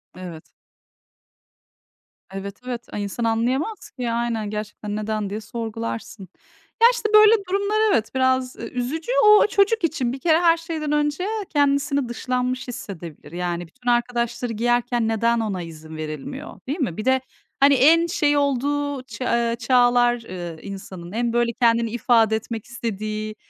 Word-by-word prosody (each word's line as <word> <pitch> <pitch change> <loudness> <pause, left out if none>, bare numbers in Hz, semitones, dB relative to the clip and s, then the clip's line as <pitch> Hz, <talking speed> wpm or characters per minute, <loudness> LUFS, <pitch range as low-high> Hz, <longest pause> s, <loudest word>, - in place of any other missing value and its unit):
Evet. 175 -3 -8 1.9
Evet, 195 +1 -7
evet. 240 -2 -5
Ay, 205 - -2
insan 200 +4 -4
anlayamaz 245 - -1
ki. 245 -3 -4
Aynen, 230 -3 -1
gerçekten 210 0 -5
"Neden?" 215 -1 -2
diye 210 +2 -4
sorgularsın. 225 -3 -6 0.5
Ya, 465 - +10
işte, 445 -3 -2
böyle, 430 +1 +8
durumlar 400 +2 +1
evet, 220 -1 +1
biraz 260 -1 +1
üzücü. 275 - -4
O 420 0 +7
çocuk 410 +1 +2
için 280 -7 0
bir 270 - -6
kere 320 +1 +3
her 335 -1 +5
şeyden 320 -3 -4
önce 295 +4 0 0.2
kendisini 280 -3 +1
dışlanmış 250 +2 -2
hissedebilir. 170 -10 -8
Yani, 175 -1 -3
bütün 245 +7 -5
arkadaşları 240 0 0
giyerken 240 +1 +1
neden 230 +1 +1
ona 205 -5 -2
izin 160 -1 -9
verilmiyor, 155 - -7
değil 290 +7 -3
mi? 225 - -2
Bir 215 - -4
de, 260 0 +3 0.4
hani, 280 +1 +6
en 320 +6 +5
şey 295 -3 +2
olduğu 285 0 0
ç 260 - -11
eee, 235 -1 +1
çağlar, 245 -1 +3
eee, 175 -6 -7
insanın, 190 -3 -8
en, 235 +1 -1
böyle, 240 0 +2
kendini 230 -1 +2
ifade 225 -2 +3
etmek 220 0 -5
istediği, 215 -2 -4
240 Hz, 145 wpm, -23 LUFS, 215-280 Hz, 1.9 s, Ya